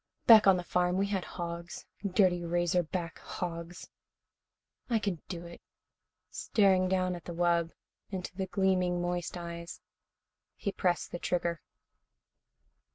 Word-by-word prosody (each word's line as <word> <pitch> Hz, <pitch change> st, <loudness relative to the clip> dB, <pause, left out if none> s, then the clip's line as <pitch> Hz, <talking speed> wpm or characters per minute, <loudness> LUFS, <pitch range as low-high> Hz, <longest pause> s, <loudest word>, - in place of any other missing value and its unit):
"Back 220 Hz, -3 st, +9 dB
on 190 Hz, -1 st, +7 dB
the 180 Hz, -, -3 dB
farm 180 Hz, +1 st, +1 dB
we 195 Hz, -, +2 dB
had 195 Hz, -2 st, -1 dB
hogs, 170 Hz, 0 st, -6 dB, 0.2 s
dirty 185 Hz, -3 st, +2 dB
razor 175 Hz, +1 st, +1 dB
back 170 Hz, 0 st, -5 dB
hogs. 170 Hz, 0 st, -6 dB, 1.0 s
I 235 Hz, -, +3 dB
can 200 Hz, -6 st, -2 dB
do 175 Hz, -2 st, -5 dB
it." 170 Hz, 0 st, -11 dB, 0.7 s
Staring 190 Hz, -3 st, +3 dB
down 185 Hz, -1 st, +1 dB
at 175 Hz, -2 st, -8 dB
the 170 Hz, -, -6 dB
wub, 170 Hz, -1 st, +2 dB, 0.4 s
into 185 Hz, -2 st, -5 dB
the 190 Hz, 0 st, -2 dB
gleaming, 185 Hz, -2 st, +1 dB
moist 175 Hz, 0 st, -2 dB
eyes, 170 Hz, 0 st, -7 dB, 0.8 s
he 200 Hz, -, -3 dB
pressed 180 Hz, -2 st, 0 dB
the 175 Hz, -, -4 dB
trigger. 170 Hz, -2 st, -1 dB
180 Hz, 135 wpm, -31 LUFS, 170-190 Hz, 1.0 s, Back